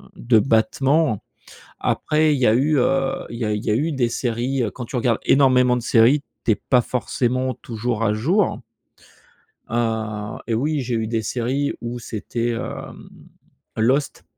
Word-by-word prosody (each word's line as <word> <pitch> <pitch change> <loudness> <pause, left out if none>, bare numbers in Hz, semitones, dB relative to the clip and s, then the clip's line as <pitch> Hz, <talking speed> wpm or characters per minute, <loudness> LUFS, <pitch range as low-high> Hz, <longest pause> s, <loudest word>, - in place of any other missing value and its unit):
de 115 -1 +2
battement. 135 +3 +2 0.6
Après 155 0 +1
il 140 - -1
y 125 - +3
a 110 - +5
eu, 145 +4 +2
heu, 135 +1 0
il 115 - -7
y - - -2
a 105 - 0
il 105 - -3
y - - -1
a 105 - +3
eu 155 +7 0
des 130 -5 +1
séries, 120 +2 -1
heu, 110 - -2
quand 125 - -7
tu 130 - -7
regardes 120 -2 +1
énormément 125 -2 +4
de 125 - -2
séries, 120 +5 +4 0.2
tu - - +3
es - - +3
pas 125 +5 +2
forcément 130 +1 -1
toujours 115 0 -4
à 105 -2 +2
jour 170 - +1 1.1
heu 110 -2 -2
et 115 - -1
oui, 145 +6 0
j'ai 125 -2 -3
eu 110 -1 -1
des 115 0 -1
séries 130 +6 -1
où 120 +1 -5
c'était, 115 +1 -3
hem, 115 - -6 0.7
Lost 130 +6 0
120 Hz, 175 wpm, -22 LUFS, 115-135 Hz, 1.1 s, a